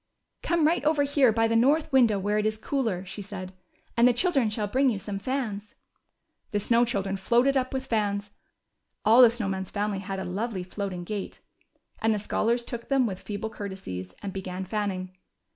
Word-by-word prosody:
Come 340 -3 +2
right 330 +3 +2
over 300 -1 +3
here 280 -3 +4
by 225 +1 +2
the 230 - 0
north 285 +7 +3
window 240 -6 +5
where 205 +2 0
it 210 - -1
is 215 0 -1
cooler/' 220 -7 -2
said 195 -1 -7
she, 185 -1 -36
and 235 +1 +6
the 250 - +4
children 270 - +2
shall 210 0 -1
bring 260 +6 +2
you 220 - -1
some 195 0 -5
fans." 215 -4 -3 0.7
The 205 - 0
Snow 235 +3 +3
Children 195 -4 -2
floated 240 +7 +3
up 255 -1 +1
with 265 0 -3
fans 205 -3 -1 0.4
— - - -52
all 230 +4 +7
the 245 - +9
Snow 230 -3 -1
Man's 190 -1 -3
family 205 -1 -2
had 195 0 -5
a 190 - -4
lovely 195 +1 -3
floating 185 -1 -5
gait 200 +2 -5 0.3
— - - -35
and 220 0 +3
the - - -1
scholars 230 +3 0
took 235 -1 -6
them 270 -2 +3
Avith 190 -5 -3
feeble 220 +1 -5
courtesies, 140 - -6
and 195 -2 -4
began 185 -1 -5
fanning. 185 -2 -3
210 Hz, 200 wpm, -27 LUFS, 195-240 Hz, 0.7 s, the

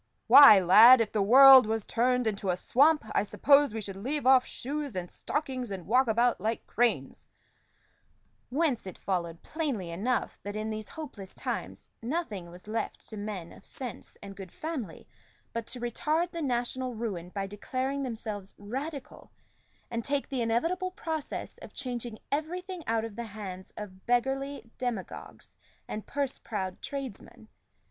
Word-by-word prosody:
"Why, 280 -8 +10
lad, 215 +8 +9
if 225 -2 0
the 215 - 0
world 260 +3 +9
was 220 -1 -1
turned 250 +1 +1
into 200 -3 -2
a 180 - +1
swamp, 295 - +3
I - - +3
suppose 280 +6 +4
we 220 0 -4
should 195 -2 -6
leave 270 +9 -3
off 260 -1 +6
shoes 285 -2 -5
and 180 -1 -4
stockings, 260 -5 -3
and 190 -4 -6
walk 250 +7 +3
about 235 +2 +2
like 225 +2 -2
cranes" 240 0 0 1.2
whence 270 -6 0
it 185 - -8
followed 170 -3 -3
plainly 270 - -3
enough 225 +9 -2
that, 205 +1 -6
in 215 +1 -3
these 215 0 -6
hopeless 240 - -9
times, - - -5
nothing 230 - -3
was 180 +3 -13
left 220 0 -4
to 220 - -8
men 205 -5 -6
of - - -16
sense 250 -4 -5
and 200 -1 -9
good 190 -2 -9
family 280 - -6 0.5
but 230 -1 -4
to 250 - -4
retard 305 +8 -1
the 335 - -5
national 250 -1 -2
ruin 200 -7 -4
by 195 +1 -3
declaring 255 +7 -3
themselves 215 -6 -5
Radicals, 265 +7 -6 0.6
and 230 -1 -2
take 280 +2 -1
the 265 -3 -2
inevitable 330 - 0
process 325 -6 -5
of - - -11
changing 240 -3 -4
everything 355 +5 -3
out 225 0 +1
of 225 -3 -8
the 235 - -5
hands 195 -3 -8
of 190 -3 -9
beggarly 270 +2 0
demagogues 240 -7 -5 0.3
and 215 - -6
purse 280 -2 -2
proud 190 -4 -5
tradesmen. 245 -4 -7
235 Hz, 155 wpm, -29 LUFS, 205-275 Hz, 1.2 s, Why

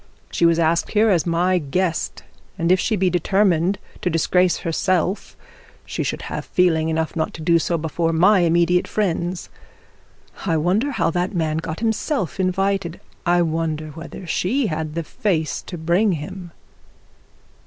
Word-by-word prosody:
She 170 - +3
was 165 -1 +3
asked 170 0 +1
her 215 0 +4
as 175 -2 +1
my 180 +2 +2
guest; 165 +3 -2 0.3
and 170 +1 +1
if 185 - +4
she 220 - +1
be 190 -1 +1
determined 185 +1 +2 0.2
to - - 0
disgrace 180 +2 +2
herself, 185 +3 -1 0.5
she - - -4
should - - -3
have - - -5
feeling 160 -3 +2
enough 160 0 -1
not 160 -1 -2
to 160 - -8
do 170 0 +4
so 170 +1 0
before 165 +1 -1
my 185 +5 +5
immediate 175 +1 +2
friends. 180 -3 -2 0.9
I 165 -4 +1
wonder 190 - +1
how 260 - 0
that 180 +4 -2
man 160 -2 0
got 160 +3 -4
himself 225 - -1
invited. 190 -1 0 0.3
I 175 0 +4
wonder 160 -1 -2
whether 165 +4 -9
she 225 +10 0
had 155 -1 -4
the 170 - -2
face 160 - -1
to 175 - -6
bring 175 +6 +2
him.' 175 +3 -6
175 Hz, 155 wpm, -21 LUFS, 160-190 Hz, 0.9 s, my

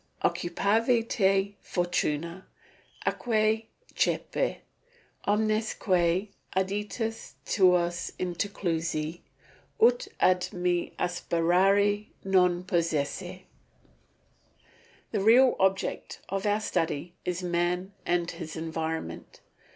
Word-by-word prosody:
"Occupavi 225 +7 +1
te, 195 -2 +2
fortuna, 175 0 -2 0.6
atque 220 -1 +1 0.3
cepi; - - 0 0.7
omnes 215 +1 +1
que 180 +1 +1 0.3
aditus 210 +4 -2
tuos 175 -3 +2
interclusi, 170 -3 -2 0.6
ut 485 +2 +4
ad 180 0 +3
me 175 -1 0
aspirare 185 +4 +2 0.2
non 180 -2 +3
posses." 165 -5 -1 1.7
The 210 - 0
real 245 +5 +6
object 190 0 0
of 195 +1 -1
our 205 +1 +2
study 170 -4 -2
is 180 0 -3
man 180 +2 -1
and 175 0 0
his 165 -2 -7
environment. 160 - -4
185 Hz, 80 wpm, -28 LUFS, 175-205 Hz, 1.7 s, real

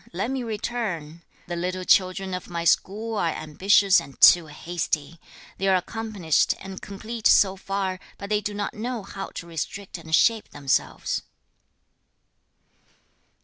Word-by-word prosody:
Let 200 +8 -2
me 265 -1 -2
return! 210 -8 -4 0.2
The 175 - -4
little 180 +2 -3
children 190 +1 +2
of 180 - -5
my 170 -1 -3
school 215 +6 +1
are 170 - +1
ambitious 190 +5 +4
and 140 0 -13
too 175 -2 +8
hasty. 160 0 -3 0.4
They 195 - 0
are 190 - +5
accomplished 200 -4 0
and 190 0 -8
complete 215 +3 -2
so 195 -1 +5
far, 195 -1 -3 0.2
but 200 +1 -8
they 210 0 +2
do 210 0 -4
not 205 0 -3
know 235 0 -4
how 195 0 -7
to - - -6
restrict 170 +3 -5
and 160 -1 0
shape 225 +2 +3
themselves.' 140 -2 -1
190 Hz, 145 wpm, -25 LUFS, 170-210 Hz, 0.4 s, too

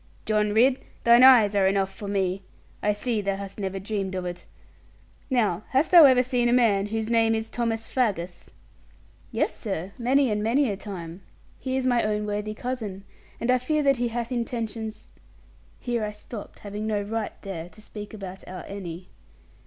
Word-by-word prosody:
'John 210 -1 +1
Ridd, 250 +5 +4 0.2
thine 235 +1 +7
eyes 245 -6 +8
are 195 -1 +4
enough 195 0 +1
for 205 - -8
me. 195 -1 0 0.4
I 210 - +2
see 215 +1 -1
thou 195 -1 -1
hast 195 +1 -7
never 195 -1 -3
dreamed 195 -1 -3
of 185 -1 -3
it. 175 0 -6 0.8
Now 215 -8 +1
hast 270 +4 +2
thou 340 -4 +10
ever 255 -2 +6
seen 245 -2 +1
a - - +3
man 210 -5 +3
whose 220 +1 -2
name 225 -1 +3
is 220 0 -4
Thomas 225 -2 -2
Faggus?' 190 -9 -2 0.8
'Yes, - - 0
sir, 195 -4 -4
many 260 +1 +3
and 210 0 0
many 240 +3 +2
a - - -2
time. 185 -3 -8 0.4
He 260 0 -2
is 260 - -1
my 245 -2 +3
own 210 0 -1
worthy 210 +1 -3
cousin; 220 -6 -5 0.4
and 235 - +1
I 255 - +3
fear 305 +4 0
he 275 - +5 0.2
that - - -12
hath 235 +1 -3
intentions' 225 -2 -4 0.7
here 240 -3 -2
I 210 0 -3
stopped, 210 +1 -9
having 210 +1 -5
no 210 -2 0
right 220 +1 -4
there 175 -4 -6
to 215 - -18
speak 210 -1 -9
about 195 -3 -8
our 185 0 -7
Annie. 180 -3 -7
215 Hz, 185 wpm, -26 LUFS, 195-240 Hz, 0.8 s, thou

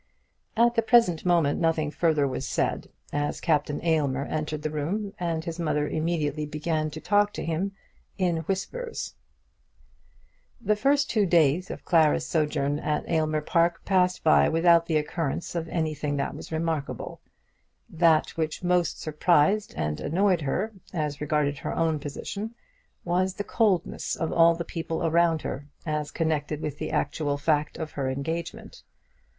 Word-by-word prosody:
At 235 +1 +5
the 230 - +2
present 220 -8 +3
moment 165 -5 +3
nothing 160 -2 +1
further 155 -4 +2
was 130 0 -4
said, - - -1 0.2
as 145 0 -1
Captain 150 -3 0
Aylmer 145 -4 +1
entered 155 -1 -3
the 155 - -2
room, 195 +8 -2
and 165 -2 -2
his 165 0 -5
mother 150 -3 0
immediately 155 -2 -1
began 155 +1 -1
to 155 - -8
talk 205 +3 +2
to - - -5
him 170 +5 -1 0.4
in 180 -3 +1
whispers. 455 - -3 1.5
The 210 -3 +1
two 210 - -15
first 285 0 +2
days 165 +1 +3
of - - -7
Clara's 160 -2 +3
sojourn 150 -3 0
at 150 -1 -2
Aylmer 155 -2 +1
Park 170 +2 +1
passed 180 -2 +2
by 70 -1 +5
without 170 0 +4
the 160 - +2
occurrence 155 0 -2
of 170 -1 -3
anything 155 -3 -1
that 140 - -2
was - - -9
remarkable. 160 -3 -3 0.7
That 165 -2 +3
which 160 +1 -3
most 180 -1 +1
surprised 165 +6 +2
and 75 -1 -2
annoyed 180 +2 +2
her, 185 +10 -1 0.2
as 150 -5 -3
regarded 150 -2 0
her - - -4
own 160 -2 +1
position, 200 +10 -6 0.5
was 185 +2 +1
the 205 - -3
coldness 205 -6 0
of 165 - -2
all 170 0 +6
the 170 0 -4
people 165 0 -3
around 165 -1 +2
her, 145 +2 -5 0.2
as 150 -2 -2
connected 155 -2 -1
with 150 -2 -5
the - - -3
actual 145 0 -1
fact 150 0 0
of 160 -2 -5
her 135 -2 -2
engagement. 160 +5 -5
160 Hz, 155 wpm, -26 LUFS, 150-175 Hz, 1.5 s, all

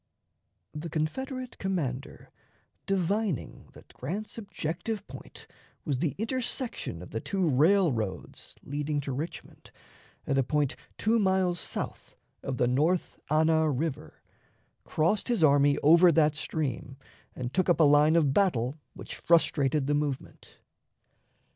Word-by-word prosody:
The 150 +3 -6
Confederate 255 - -4
commander, 140 -9 -4 0.6
divining 195 - -1
that - - -17
Grant's 195 +12 -5
objective 200 0 -4
point - - -12 0.4
was 140 -5 -1
the 155 -3 -1
intersection 235 - -2
of 90 - -12
the 110 - -2
two 190 - -1
railroads 145 - +1
leading 145 +1 -2
to 140 - -5
Richmond 150 +6 -7 0.6
at 135 0 +1
a - - +3
point 145 +1 0 0.2
two 225 +2 +2
miles 190 -3 +2
south - - -5 0.3
of 130 -2 -4
the 120 - +2
North 155 +8 0
Anna 160 +1 +3
River, 150 +1 -4 0.6
crossed 170 +7 0
his 235 -9 +1
army 140 -1 +5
over 170 +4 +7
that 155 -1 +3
stream 140 -4 -3 0.4
and 125 0 -5
took 185 -1 +1
up 170 - +3
a - - +6
line 150 +2 +5
of 150 -5 +3
battle 145 - +1 0.2
which - - -8
frustrated 150 -4 +2
the 145 - +1
movement. 145 -2 -4
155 Hz, 130 wpm, -28 LUFS, 140-185 Hz, 0.6 s, over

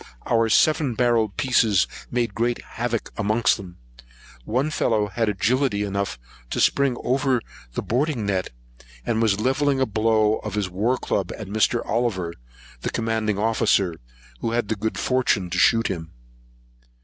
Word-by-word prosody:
Our 115 -1 +2
seven 150 0 +3
barrelled 115 -4 +1
pieces 110 -7 +3 0.2
made 120 -1 -1
great 120 +1 0
havoc 115 -1 -3
amongst 110 +1 +2
them. 90 -4 -11 0.7
One 130 +7 0
fellow 110 -7 +1
had 110 +3 0
agility 105 +2 +1
enough 100 0 -2 0.3
to - - -2
spring 140 -3 +2
over 130 0 +1 0.4
their - - -2
boarding 130 -2 0
netting, 95 -10 -2 0.5
and 115 0 0
was 105 -3 +2
levelling 135 +4 +1
a 130 - +3
blow 110 -1 +2
with - - -4
his 100 -3 -1
war 110 +8 +1
club 95 -6 -2
at 110 - -6
Mr. 110 +4 +1
Oliver, 105 -7 -1 0.5
the - - -3
commanding 110 -2 -1
officer, 105 -4 +2 0.5
who 115 - -2
had 120 -3 -1
the 110 - +1
good 110 +2 -3
fortune 115 -8 +1
to 90 - 0
shoot 115 0 +4
him. 80 -4 -4
110 Hz, 150 wpm, -23 LUFS, 100-120 Hz, 0.7 s, shoot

